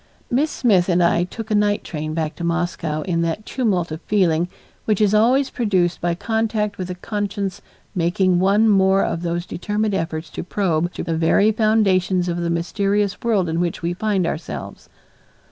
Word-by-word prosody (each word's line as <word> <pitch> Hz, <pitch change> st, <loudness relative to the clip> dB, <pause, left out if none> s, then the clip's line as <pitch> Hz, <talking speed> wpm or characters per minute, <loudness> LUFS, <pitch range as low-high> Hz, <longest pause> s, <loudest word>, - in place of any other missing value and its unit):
Miss 280 Hz, +6 st, +2 dB
Smith 195 Hz, -11 st, +2 dB
and 175 Hz, 0 st, +3 dB
I 170 Hz, 0 st, +3 dB
took 220 Hz, +4 st, -8 dB
a -, -, +3 dB
night 205 Hz, 0 st, +2 dB
train 155 Hz, -1 st, -5 dB
back 155 Hz, -2 st, -2 dB
to 170 Hz, -, -6 dB
Moscow 170 Hz, -2 st, -1 dB
in 170 Hz, -3 st, -1 dB
that 170 Hz, +6 st, -2 dB
tumult 190 Hz, -10 st, -1 dB
of 155 Hz, +2 st, -5 dB
feeling 175 Hz, -5 st, +1 dB, 0.4 s
which 215 Hz, -3 st, +1 dB
is 210 Hz, -1 st, +3 dB
always 250 Hz, +6 st, +3 dB
produced 185 Hz, -7 st, 0 dB
by 175 Hz, 0 st, 0 dB
contact 215 Hz, +1 st, -1 dB
with 185 Hz, -1 st, -4 dB
a 180 Hz, -, -4 dB
conscience 200 Hz, 0 st, -3 dB, 0.3 s
making 180 Hz, 0 st, +2 dB
one 200 Hz, +4 st, +4 dB
more 195 Hz, -1 st, +4 dB
of 165 Hz, -, -2 dB
those 175 Hz, 0 st, -2 dB
determined 210 Hz, +4 st, -2 dB
efforts 165 Hz, -3 st, -3 dB
to -, -, -5 dB
probe 175 Hz, -3 st, 0 dB
to -, -, -5 dB
the 165 Hz, -1 st, -2 dB
very 165 Hz, +6 st, +3 dB
foundations 195 Hz, -5 st, +2 dB
of 170 Hz, -1 st, -1 dB
the 170 Hz, -1 st, -1 dB
mysterious 195 Hz, +4 st, 0 dB
world 210 Hz, -6 st, +1 dB
in 165 Hz, +1 st, -1 dB
which 175 Hz, -1 st, -2 dB
we 170 Hz, +1 st, 0 dB
find 195 Hz, -1 st, 0 dB
ourselves. 155 Hz, -1 st, -6 dB
185 Hz, 180 wpm, -21 LUFS, 170-210 Hz, 0.4 s, one